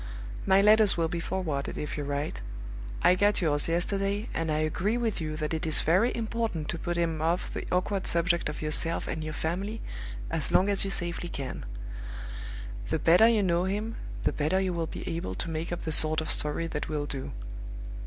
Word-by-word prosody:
My 190 +1 +6
letters 210 -1 +6
will 165 -1 +1
be 175 0 -2
forwarded 165 -5 -2
if 150 - -3
you 150 - -2
write. 145 - -2 0.6
I - - +7
got 205 +3 +3
yours 150 -5 +2
yesterday, 195 +5 0
and 165 -1 -1
I 150 - +1
agree 170 +8 +1
with 225 -6 -1
you 155 -1 -3
that 155 0 -2
it 160 - -2
is 155 - +7
very 185 +9 +4
important 225 -8 -2
to 170 - -2
put 175 +1 -2
him 165 -2 0
off 170 +3 0
the - - -4
awkward 185 +1 +1
subject 170 -1 +2
of 150 - -5
yourself 165 +2 0
and 155 - -3
your 155 0 -4
family 190 +8 -2 0.5
as 160 -3 -1
long 190 +2 +5
as 200 - +3
you 195 - -1
safely 175 -2 -2
can. 135 - -5 1.2
The - - +2
better 180 +7 +6
you 225 -3 +4
know 175 -1 +2
him, 210 +4 -2 0.3
the - - +2
better 155 +6 +1
you 190 -2 0
will 165 -1 -1
be - - -6
able 165 - -3
to 165 - -3
make 160 +2 -3
up 175 - -3
the 160 - -2
sort 155 0 +3
of 160 - -2
story 150 +2 0
that 155 -2 -3
will 150 -2 -1
do. 135 -2 -4
170 Hz, 205 wpm, -29 LUFS, 155-195 Hz, 1.2 s, I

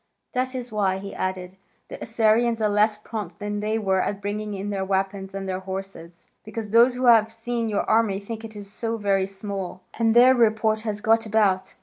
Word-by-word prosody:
That 255 0 -1
is 245 -2 -5
why," 195 -3 +1
he 195 +1 -7
added, 185 0 -4 0.3
"the - - -9
Assyrians 225 +1 +2
are 215 - +2
less 210 +1 +2
prompt 210 -5 -6
than 205 0 -3
they 215 +1 -1
were 190 -3 +1
at 200 - -2
bringing 205 +1 -4
in 200 +1 -4
their 195 -1 -2
weapons 195 0 -2
and 195 0 -4
their 185 0 -2
horses, 190 -3 -8 0.2
because 215 -1 -6
those 240 +3 +5
who 255 +1 -1
have 225 -2 +6
seen 230 0 -3
your 205 - 0
army 220 -3 +2
think 220 +2 -7
it 215 -2 -8
so 225 +3 -4
very 195 -2 +1
small, 195 -2 -6 0.2
and 225 0 +3
their 250 +2 +8
report 220 -2 +2
has 215 -2 -4
got 225 +1 +2
about. 195 -3 +1
210 Hz, 200 wpm, -24 LUFS, 195-225 Hz, 0.3 s, their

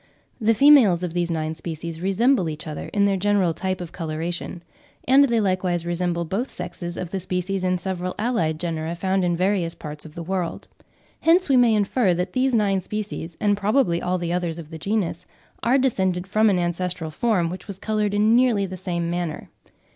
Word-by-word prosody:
The 225 -1 +3
females 235 - +6
of 175 -2 -3
these 175 -1 0
nine 160 -1 -2
species 165 0 -6
resemble 195 +1 +2
each 155 0 -7
other 155 -2 -6
in 200 -1 +2
their 200 -1 +2
general 195 -3 +2
type 185 +2 -3
of 175 -2 -7
coloration; 170 +1 -4 0.4
and 270 +2 +6
they 235 -4 +1
likewise 185 -4 0
resemble 175 0 -1
both 210 +10 -2
sexes 175 -1 -6
of 180 -1 -5
the 195 - -2
species 185 +1 -2
in 185 0 +1
several 180 0 -4
allied 175 -10 0
genera 165 -1 -3
found 190 +2 0
in 175 -1 +1
various 185 -2 0
parts 150 -1 -8
of 155 -1 -13
the 170 - -5
world. 180 -1 -3 0.5
Hence 340 +1 +4
we 270 - +5
may 240 -3 +5
infer 205 -2 +2
that 180 +1 -3
these 255 -1 +2
nine 200 -3 +2
species, 195 -5 -5
and 205 -1 +2
probably 205 -3 +1
all 180 +1 0
the 170 -1 -2
others 175 -2 -2
of 165 -2 -9
the 160 - -7
genus, 200 0 -2 0.3
are 250 +3 +3
descended 190 -9 0
from 215 +3 +3
an 195 - +2
ancestral 175 -1 -2
form 180 -3 +1
which 185 - -8
was 200 -3 -7
coloured 210 0 -1
in 215 +2 +4
nearly 240 -5 +3
the 185 0 -7
same 175 -2 -2
manner. 175 -3 -4
185 Hz, 195 wpm, -23 LUFS, 170-210 Hz, 0.5 s, females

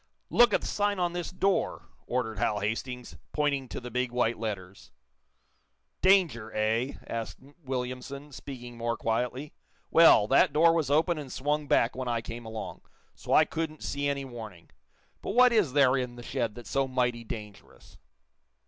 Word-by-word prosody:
"Look 240 -1 +6
at - - +2
the - - -6
sign 205 -1 0
on 175 -1 0
this 175 -1 -3
door," 190 +1 0 0.2
ordered 115 -4 -2
Hal 105 - +1
Hastings, 115 0 -4 0.2
pointing 140 -4 0
to - - -5
the 125 0 -8
big 125 +1 -1
white 120 -2 0
letters. 100 -4 -6 1.1
"Danger, 175 - +3
eh?" 115 +5 0
asked 115 -1 -5 0.3
Williamson, 130 +2 -5
speaking 125 -3 -9
more 115 0 -1
quietly. 125 +5 -2 0.4
"Well, 160 -10 +7
that 140 +1 +4
door 165 +2 +5
was 160 -4 0
open 160 +3 +2
and 140 -3 -8
swung 150 +2 -1
back 115 - +3
when 130 0 -4
I 120 -1 0
came 115 +1 -8
along, 110 0 -6 0.3
so - - -8
I - - +6
couldn't 160 -1 -4
see 140 0 -2
any 140 -1 -2
warning. 110 - -10 0.5
But - - -4
what 250 0 +6
is 195 - +2
there 135 -2 +5
in 125 -2 -2
the 120 - -10
shed 115 -2 -2
that's 120 - -10
so 135 -1 +1
mighty 125 -2 0
dangerous?" 105 - -10
125 Hz, 165 wpm, -28 LUFS, 115-150 Hz, 1.1 s, Well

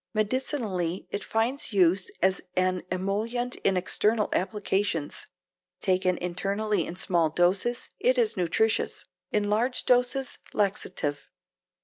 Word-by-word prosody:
Medicinally 215 - -1
it 200 - -3
finds 240 +4 0
use 185 -1 +3
as 190 0 +3
an 185 0 +1
emollient 220 +7 -1
in 195 -1 +2
external 210 +4 +2
applications. 190 -5 -1 0.5
Taken 185 -1 +1
internally 195 +2 -1
in 170 - -6
small 170 -3 +1
doses 185 +9 +1
it 255 +1 +3
is 230 -3 +2
nutritious; 185 +5 0 0.3
in 210 -1 +1
large 235 +5 +1
doses 250 +1 +2
laxative. 185 -7 -1
200 Hz, 110 wpm, -27 LUFS, 185-225 Hz, 0.5 s, use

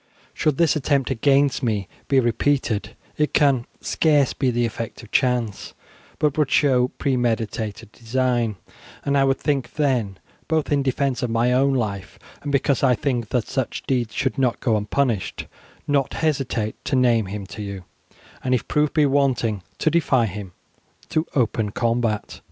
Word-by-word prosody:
Should 150 -3 0
this 165 -2 +3
attempt 140 -2 +1
against 135 +3 +2
me 105 -6 -1 0.2
be 135 -2 +4
repeated 120 -3 0 0.2
it 150 0 0
can 135 -5 +3
scarce 145 -4 +2
be 135 - 0
the 120 0 +1
effect 115 +1 -5
of 115 - -14
chance, 125 -6 0 0.4
but 150 -1 +1
would 150 -3 +2
show 130 -4 +3
premeditated 115 -6 -2
design, 120 -1 0 0.5
and 140 - +1
I 135 - +4
would 135 -1 +1
then, 135 -7 0 0.3
both 160 -2 0
in 145 -1 +3
defence 135 0 0
of 125 - -1
my 115 +2 +2
own 135 +2 +3
life, 100 -6 -3 0.2
and 145 - -4
because 140 -2 +1
I 130 -2 +4
think 120 -4 -2
that 125 -3 0
such 130 -3 -3
deeds 120 -4 -1
should 130 0 -1
not 125 -3 +1
go 115 -4 +1
unpunished, 105 0 -1 0.4
not 140 -2 +1
hesitate 135 -8 -1
to - - 0
name 120 -5 +3
him 100 +1 -5
to 105 - -8
you, 100 -2 -6 0.6
and 130 0 +2
if 125 - -3
proof 150 -1 +1
be 150 -2 +5
wanting 130 -7 +1 0.2
to 155 - +1
defy 140 -7 +3
him 100 -3 -6 0.6
to 155 +1 0
open 115 -4 +1
combat." 115 -1 -1
125 Hz, 160 wpm, -22 LUFS, 115-140 Hz, 0.6 s, be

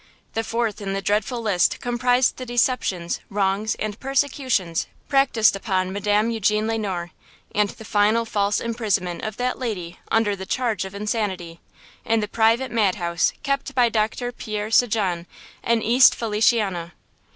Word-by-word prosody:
The 225 - -1
fourth 225 -1 -2
in 195 -1 -3
the 195 - -2
dreadful 215 +4 0
list 190 -6 +2
comprised 245 +1 +1
the 255 - -6
deceptions, 235 -8 0
wrongs 200 +2 0
and 215 0 -4
persecutions 260 - 0 0.2
practiced 265 -7 +3
upon 190 -2 -1
Madame 210 +2 +1
Eugene 215 -1 +1
Le 225 0 -1
Noir, 180 -4 -3 0.4
and 205 -1 +2
the 220 - -11
final 215 +3 +2
false 205 -2 0
imprisonment 210 -7 -1
of 215 0 -4
that 250 0 -1
lady 185 -9 -4
under 225 -2 +2
the 190 -1 -8
charge 230 -7 -1
of 190 +1 -9
insanity, 200 -5 -3 0.4
in 225 0 +1
the 210 - -2
private 230 +4 +2
madhouse 180 -7 +1
kept 275 -1 -2
by 245 -2 +4
Doctor 225 +2 -1
Pierre 215 -2 -5
St. 240 0 +4
Jean, 180 -6 -1 0.4
in 230 -1 +1
East 245 +3 +6
Feliciana. 210 -6 +1
215 Hz, 150 wpm, -23 LUFS, 195-235 Hz, 0.4 s, East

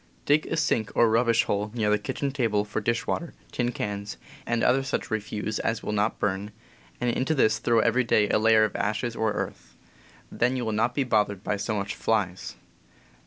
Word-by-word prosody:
Dig 150 +2 +3
a 165 - -2
sink 120 -9 0
or 120 - +5
rubbish 115 +1 +3
hole 105 +1 -1
near 105 -3 +1
the 105 - +3
kitchen 140 +6 -3
table, 115 -7 0
for 105 +1 -3
dishwater, 115 +9 -2 0.2
tin 120 -1 -1
cans, 105 -2 -4 0.3
and 120 0 0 0.2
such 135 - -6
other - - -6
refuse 105 0 -3
as 115 0 -2
will - - -3
^,., - - -2
not 105 +2 0
burn, 100 +1 -2 0.5
and 125 -1 +1
into 135 +6 0
this 110 -6 +3
throw 115 -2 +3
every 115 +3 +2
day 110 -3 +3
a - - +3
layer 110 0 +5
of 110 - -1
ashes 110 +3 -1
or 110 -1 0
earth. - - -6 0.6
Then 125 +2 +1
you 125 - -2
will 110 - -1
not 115 +3 0
be 140 - +2
bothered 105 -5 +1 0.2
so 105 +1 -1
much 100 -1 -3
by - - -18
flies. 95 -5 -1
110 Hz, 205 wpm, -26 LUFS, 105-120 Hz, 0.6 s, or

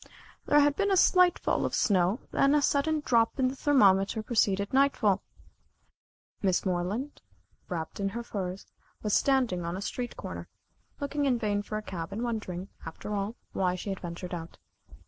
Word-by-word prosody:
There 295 - +5
had 290 0 +3
been 400 0 +1
a 385 - +3
slight 365 -1 +5
fall - - 0
of - - -1
snow, 190 +2 +2
then 275 +2 +3
a 295 - +4
sudden 305 +2 +1
drop 230 -2 +3
in 260 -2 +2
the 265 - -6
thermometer 215 -7 +3
preceded 200 -3 +1
nightfall. 255 -8 +3 1.2
Miss 190 -2 +1
Moreland, 190 +10 -2 0.5
wrapped 165 -1 -4
in 195 0 0
her 235 +4 -5
furs, 190 -4 -5 0.4
was 210 -2 0
standing 250 -10 +2
on 170 +2 -3
a - - -4
street 245 +3 -4
corner, - - -7 0.5
looking 285 0 -1
in 255 -3 +2
vain 205 -3 0
for 215 +1 -5
a 215 - -5
cab, 175 -3 -6
and 215 +4 -3
wondering, 200 -6 -4
after 165 +5 -6
all, 205 +3 -2 0.2
why 180 -1 +1
she 185 - -6
had 195 - -4
ventured 175 +1 -6
out. 165 -1 -7
210 Hz, 175 wpm, -29 LUFS, 185-265 Hz, 1.2 s, There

